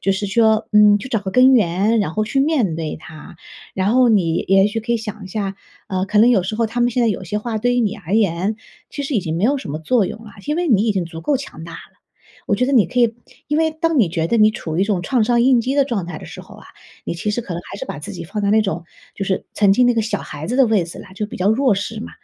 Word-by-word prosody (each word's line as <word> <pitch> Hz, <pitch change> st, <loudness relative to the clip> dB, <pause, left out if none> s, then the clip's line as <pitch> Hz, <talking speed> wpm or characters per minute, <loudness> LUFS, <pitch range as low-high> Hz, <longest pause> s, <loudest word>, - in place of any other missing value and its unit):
就 195 Hz, -, +2 dB
是 200 Hz, +2 st, -2 dB
说， 220 Hz, +2 st, +2 dB
嗯， 210 Hz, -1 st, +6 dB
去 255 Hz, -, -8 dB
找 225 Hz, -, 0 dB
个 190 Hz, -2 st, -5 dB
根 255 Hz, +1 st, +6 dB
源， 205 Hz, +2 st, +2 dB
然 175 Hz, -6 st, -2 dB
后 215 Hz, -, 0 dB
去 270 Hz, -, -2 dB
面 270 Hz, -, +1 dB
对 160 Hz, -2 st, -4 dB
它。 155 Hz, +1 st, -12 dB, 0.4 s
然 195 Hz, +3 st, 0 dB
后 255 Hz, -1 st, +5 dB
你 170 Hz, -6 st, +2 dB
也 195 Hz, +1 st, +5 dB
许 225 Hz, -, -3 dB
可 235 Hz, +2 st, -2 dB
以 -, -, +2 dB
想 215 Hz, -2 st, -7 dB
一 -, -, -9 dB
下， 195 Hz, -1 st, -4 dB, 0.3 s
呃， 185 Hz, 0 st, -1 dB
可 210 Hz, +1 st, +1 dB
能 230 Hz, +3 st, +6 dB
有 195 Hz, -7 st, +3 dB
时 215 Hz, -, -3 dB
候 230 Hz, -1 st, +1 dB
他 240 Hz, +2 st, -4 dB
们 240 Hz, -, +3 dB
现 245 Hz, -, -1 dB
在 230 Hz, -, +3 dB
有 190 Hz, -2 st, -3 dB
些 210 Hz, +4 st, -3 dB
话 220 Hz, 0 st, -3 dB
对 245 Hz, +2 st, +1 dB
于 245 Hz, -, +2 dB
你 215 Hz, -1 st, -1 dB
而 195 Hz, -1 st, -4 dB
言， 200 Hz, 0 st, +1 dB, 0.3 s
其 285 Hz, -, -5 dB
实 275 Hz, 0 st, -3 dB
已 215 Hz, -, +2 dB
经 160 Hz, -1 st, -3 dB
没 190 Hz, -, 0 dB
有 280 Hz, +4 st, +2 dB
什 150 Hz, -, -7 dB
么 155 Hz, -, -4 dB
作 205 Hz, +5 st, +1 dB
用 225 Hz, -, -7 dB
了， 205 Hz, -, -12 dB
因 300 Hz, -, 0 dB
为 350 Hz, -2 st, -1 dB
你 215 Hz, -3 st, +3 dB
已 215 Hz, -, +2 dB
经 185 Hz, -3 st, -1 dB
足 165 Hz, -1 st, -9 dB
够 290 Hz, -2 st, +1 dB
强 165 Hz, -, -9 dB
大。 165 Hz, -1 st, -9 dB, 0.7 s
我 205 Hz, -, +1 dB
觉 250 Hz, -, +1 dB
得 280 Hz, -, -1 dB
你 230 Hz, -7 st, +5 dB
可 250 Hz, -, -4 dB
以 235 Hz, -2 st, +3 dB, 0.3 s
因 300 Hz, +1 st, 0 dB
为 320 Hz, 0 st, +2 dB
当 315 Hz, -2 st, 0 dB
你 195 Hz, -, +3 dB
觉 165 Hz, -1 st, -1 dB
得 230 Hz, +7 st, +1 dB
你 215 Hz, 0 st, +5 dB
处 160 Hz, -6 st, -5 dB
于 180 Hz, -, +1 dB
一 -, -, +3 dB
种 200 Hz, -4 st, -1 dB
创 245 Hz, +4 st, +1 dB
伤 240 Hz, +2 st, +2 dB
应 250 Hz, 0 st, +4 dB
激 260 Hz, +4 st, -2 dB
的 280 Hz, -, +4 dB
状 225 Hz, -9 st, -2 dB
态 170 Hz, -2 st, -7 dB
的 -, -, -11 dB
时 -, -, -9 dB
候 -, -, -14 dB
啊， -, -, -15 dB, 0.4 s
你 -, -, -3 dB
其 195 Hz, +5 st, -3 dB
实 225 Hz, -, -1 dB
可 180 Hz, -6 st, -6 dB
能 175 Hz, -, -5 dB
还 195 Hz, -, -7 dB
是 -, -, -4 dB
把 145 Hz, -, -7 dB
自 150 Hz, -, -7 dB
己 170 Hz, -2 st, -7 dB
放 210 Hz, +4 st, -5 dB
在 200 Hz, -, +1 dB
那 220 Hz, +1 st, +4 dB
种 175 Hz, -5 st, -3 dB, 0.3 s
就 195 Hz, -, -4 dB
是 190 Hz, -1 st, -2 dB
曾 200 Hz, -2 st, +4 dB
经 250 Hz, +4 st, +4 dB
那 245 Hz, -, +3 dB
个 225 Hz, -, +1 dB
小 210 Hz, -1 st, -2 dB
孩 150 Hz, +4 st, -8 dB
子 250 Hz, -, -1 dB
的 265 Hz, -3 st, +5 dB
位 215 Hz, -5 st, +2 dB
子 170 Hz, -, -10 dB
了， -, -, -9 dB
就 210 Hz, +2 st, -3 dB
比 -, -, -9 dB
较 185 Hz, +2 st, +1 dB
弱 245 Hz, -2 st, +2 dB
势 210 Hz, +2 st, -4 dB
嘛。 -, -, -7 dB
210 Hz, 335 characters per minute, -19 LUFS, 190-240 Hz, 0.7 s, 嗯